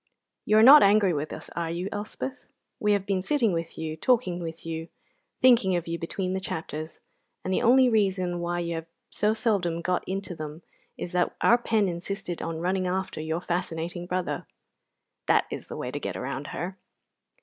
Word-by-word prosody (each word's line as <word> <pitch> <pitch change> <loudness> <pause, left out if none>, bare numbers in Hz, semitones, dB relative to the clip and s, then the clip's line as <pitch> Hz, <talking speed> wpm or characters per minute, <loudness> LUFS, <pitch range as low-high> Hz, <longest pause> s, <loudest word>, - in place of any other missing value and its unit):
You 215 - +4
are 220 - +7
not 285 +5 +11
angry 200 -2 +5
with 150 0 -3
us, - - -8
are 170 -1 -2
you, 175 +3 -3
Elspeth? 220 +6 -5 0.3
We 210 0 +3
have 200 -1 0
been 195 -2 0
sitting 230 -1 +1
with 165 0 -4
you, 160 -1 -3
talking 225 -1 +1
with 165 -1 -7
you, 165 0 -4 0.5
thinking 235 -7 +5
of 175 -1 -2
you 170 0 -3
between 185 +2 -2
the 190 - -1
chapters, 160 -3 -5 0.4
and 185 - 0
the - - +1
only 255 +2 +6
reason 190 -6 +1
why 175 0 -1
you 170 0 -2
have 165 0 -5 0.2
so 210 +1 +1
seldom 195 -7 0
got 180 +1 0
into 190 -1 -3
them 155 0 -7 0.3
is 175 - -5
that 180 -1 +1
our 235 - +5
pen 220 -4 +2
insisted 180 +1 -4
on 165 0 -3
running 185 +1 0
after 185 -3 -2
your 160 +2 -2
fascinating 175 0 -3
brother. 180 0 -2 0.8
(That - - +4
is - - -6
the - - -7
way - - -4
to - - -4
get - - -4
round 145 +2 -4
her.) 185 +5 -5
180 Hz, 190 wpm, -27 LUFS, 170-205 Hz, 0.8 s, not